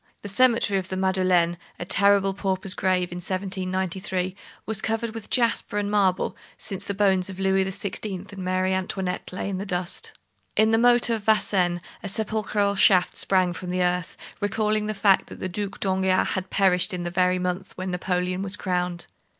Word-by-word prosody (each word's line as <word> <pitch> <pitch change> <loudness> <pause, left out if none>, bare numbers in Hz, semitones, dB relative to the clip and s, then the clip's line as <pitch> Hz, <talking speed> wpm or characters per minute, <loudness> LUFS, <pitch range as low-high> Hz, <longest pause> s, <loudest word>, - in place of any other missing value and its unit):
The 205 - -5
cemetery 230 -2 +3
of 185 - -6
the 185 - -4
Madeleine, 185 -2 +2 0.2
a 175 - -4
terrible 200 +1 +3
pauper's 190 -1 -2
grave 180 -1 0
in 175 - -5
1793, 185 0 -2 0.3
was 220 -1 -2
covered 225 0 -2
with 225 -2 -8
jasper 235 -3 +1
and 205 0 -1
marble, 195 -3 +1 0.2
since 195 0 -4
the 200 - -4
bones 190 -2 +2
of 190 0 -8
Louis 190 0 +2
XVI. 195 0 -5
and 190 -2 -6
Marie 185 +1 0
Antoinette 185 -1 -3
lay 185 - -4
in 190 -2 -3
that 200 - -5
dust. 180 -1 -2 0.4
In 220 +1 +4
the 225 - +4
moat 240 0 +5
of 220 -3 -2
Vincennes 185 -5 +2 0.2
a 200 - -5
sepulchral 210 -1 0
shaft 185 -2 +4
sprang 185 -2 +2
from 180 +1 -7
the 180 0 0
earth, 180 0 -1 0.2
recalling 210 +1 0
the 215 - -2
fact 195 -1 +3
that - - -10
the - - -3
Duc 200 +2 -4
d'Enghien 190 -1 +1
had 190 -1 -3
perished 190 0 +2
in 175 - -4
the 175 - -3
very 180 0 +2
month 180 +1 -3
when 185 0 -3
Napoleon 180 0 -1
was 195 0 -1
crowned. 180 -1 -2
190 Hz, 185 wpm, -25 LUFS, 180-200 Hz, 0.4 s, moat